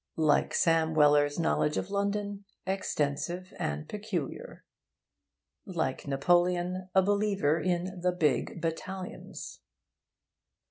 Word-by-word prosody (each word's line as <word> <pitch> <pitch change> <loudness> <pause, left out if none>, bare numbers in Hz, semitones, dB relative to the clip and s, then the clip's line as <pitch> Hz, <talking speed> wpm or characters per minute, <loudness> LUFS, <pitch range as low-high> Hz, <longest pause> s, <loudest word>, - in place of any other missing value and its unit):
Like 155 -2 +3
Sam 165 -2 +3
Weller's 145 -1 +4
knowledge 155 -2 +1
of 195 - -3
London, 200 0 -1 0.2
'extensive 180 -1 -2
and 75 +1 -2
peculiar.' 205 -8 -5 1.0
Like 160 -7 -3
Napoleon, 175 +5 +1
a 190 - +6
believer 200 -6 +2
in 180 +2 -1
'the 180 0 +2
big 155 -1 0
battalions.' 180 +3 -5
175 Hz, 95 wpm, -30 LUFS, 155-190 Hz, 1.0 s, a